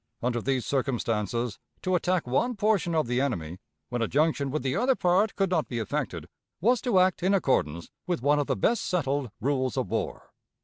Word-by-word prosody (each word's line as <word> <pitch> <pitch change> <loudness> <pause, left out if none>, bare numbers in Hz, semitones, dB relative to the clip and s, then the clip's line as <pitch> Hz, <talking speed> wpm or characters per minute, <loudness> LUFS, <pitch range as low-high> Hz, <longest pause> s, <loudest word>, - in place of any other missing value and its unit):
Under 120 -1 0
these 130 0 0
circumstances, 120 -4 -1 0.2
to 185 - 0
attack 180 -1 +1
one 235 - 0
portion 205 -5 +1
of 155 - +2
the 125 +2 0
enemy, 90 - -2 0.3
when 120 - -2
a 115 - +1
junction 145 0 +1
with 140 -1 -2
the 130 -1 0
other 255 +2 +3
part 190 +3 +2
could 195 -2 0
not 165 -4 +1
be 120 - -4
effected, 110 -3 -3 0.3
was 240 +6 +3
to 240 -7 +1
act 185 0 +3
in 190 +3 +3
accordance 85 - 0 0.2
with 175 -9 -1
one 145 +1 +4
of 145 - -1
the - - +1
best 235 - +1
settled 140 -6 -1
rules 130 -2 0
of - - -1
war. - - -4
140 Hz, 195 wpm, -27 LUFS, 125-185 Hz, 0.3 s, one